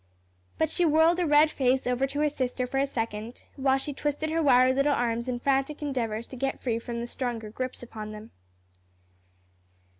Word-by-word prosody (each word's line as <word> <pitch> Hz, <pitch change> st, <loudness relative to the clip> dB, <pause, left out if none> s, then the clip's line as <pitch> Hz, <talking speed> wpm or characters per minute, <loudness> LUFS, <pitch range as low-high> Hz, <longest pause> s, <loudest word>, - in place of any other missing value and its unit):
But 315 Hz, -1 st, +1 dB
she 355 Hz, -, +1 dB
whirled 325 Hz, +2 st, +4 dB
a 350 Hz, -, +1 dB
red 300 Hz, +1 st, +5 dB
face 260 Hz, -1 st, +1 dB
over 250 Hz, +2 st, +1 dB
to 285 Hz, +2 st, -3 dB
her 300 Hz, -, +3 dB
sister 255 Hz, -3 st, -2 dB
for 270 Hz, +2 st, -2 dB
a 275 Hz, -, +2 dB
second, 225 Hz, -2 st, -4 dB
while 270 Hz, -1 st, +2 dB
she 285 Hz, +2 st, -4 dB
twisted 295 Hz, +3 st, -2 dB
her 330 Hz, +1 st, +1 dB
wiry 255 Hz, -3 st, +5 dB
little 275 Hz, +2 st, +2 dB
arms 235 Hz, +1 st, -1 dB
in 245 Hz, -, -1 dB
frantic 275 Hz, +3 st, 0 dB
endeavors 235 Hz, -6 st, -2 dB
to -, -, -8 dB
get 270 Hz, +2 st, -2 dB
free 230 Hz, -3 st, -1 dB
from 235 Hz, 0 st, -5 dB
the -, -, -3 dB
stronger 240 Hz, -3 st, -4 dB
grips 255 Hz, +2 st, -5 dB
upon 215 Hz, -3 st, -7 dB
them. 215 Hz, +1 st, -10 dB
260 Hz, 190 wpm, -27 LUFS, 235-290 Hz, -, red